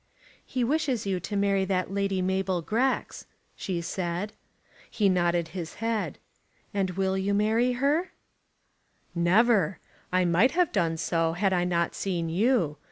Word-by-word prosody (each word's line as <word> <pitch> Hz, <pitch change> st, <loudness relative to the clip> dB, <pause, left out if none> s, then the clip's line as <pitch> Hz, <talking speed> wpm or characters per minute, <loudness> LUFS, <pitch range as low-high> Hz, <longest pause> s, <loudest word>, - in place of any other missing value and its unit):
"He 255 Hz, -, -2 dB
wishes 265 Hz, -4 st, 0 dB
you 190 Hz, -2 st, -1 dB
to 205 Hz, +4 st, -5 dB
marry 200 Hz, -1 st, +2 dB
that 190 Hz, -1 st, -1 dB
Lady 195 Hz, -2 st, 0 dB
Mabel 190 Hz, -1 st, 0 dB
Grex," 250 Hz, +9 st, -1 dB, 0.3 s
she 180 Hz, -3 st, -3 dB
said. 175 Hz, +3 st, -3 dB, 0.6 s
He 205 Hz, -3 st, +2 dB
nodded 175 Hz, -2 st, +1 dB
his 165 Hz, -1 st, -6 dB
head. 225 Hz, -1 st, -2 dB, 0.6 s
"And 195 Hz, -2 st, 0 dB
you 180 Hz, -, -7 dB
will 190 Hz, 0 st, 0 dB, 0.2 s
marry 225 Hz, +4 st, +2 dB
her?" 290 Hz, +8 st, +1 dB, 1.0 s
"Never! 190 Hz, +2 st, +3 dB, 0.3 s
I 185 Hz, 0 st, +2 dB
might 175 Hz, +9 st, +3 dB
have 355 Hz, -1 st, +2 dB
done 170 Hz, -6 st, 0 dB
so, 165 Hz, 0 st, 0 dB
had 190 Hz, +2 st, +1 dB
I 175 Hz, -1 st, +1 dB
not 170 Hz, -1 st, 0 dB
seen 175 Hz, -4 st, -2 dB
you. 180 Hz, -, +1 dB
190 Hz, 145 wpm, -27 LUFS, 175-220 Hz, 1.0 s, Never